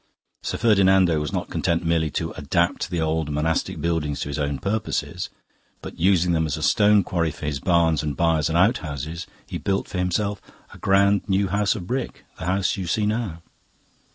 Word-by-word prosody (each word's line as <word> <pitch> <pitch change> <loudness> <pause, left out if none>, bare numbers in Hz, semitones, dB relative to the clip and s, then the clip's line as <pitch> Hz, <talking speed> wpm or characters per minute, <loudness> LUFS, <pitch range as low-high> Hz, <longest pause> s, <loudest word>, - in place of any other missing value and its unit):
Sir - - -3
Ferdinando 95 -6 +4
was 75 -1 -3
not - - -3
content 85 0 0
merely 80 -1 +1
to - - -3
adapt 85 +5 0
the 85 - -2
old 80 -1 0
monastic 75 +3 -1
buildings 80 -4 -1
to - - -3
his 70 - -3
own 70 -1 -1
purposes; 105 +6 -2 0.5
but - - -10
using 90 0 +3
them 80 -1 +1
as 75 - -2
a - - -5
stone 105 -1 +4
quarry 85 -2 0
for 75 - -8
his 75 -2 -2
barns 80 -1 +2
and 75 -3 -3
byres 80 -3 +2
and 80 - +1
outhouses, 80 - 0 0.2
he - - -5
built 100 0 -1
for 90 - -4
himself 100 +2 -1 0.3
a - - -13
grand 100 +1 +3
new 95 0 +2
house 105 +2 +1
of 95 -6 -6
brick 125 +6 -4
the - - -5
house 95 +2 0
you 95 -2 -4
see 105 +4 +1
now." 105 -6 -2
85 Hz, 190 wpm, -23 LUFS, 80-100 Hz, 0.5 s, Ferdinando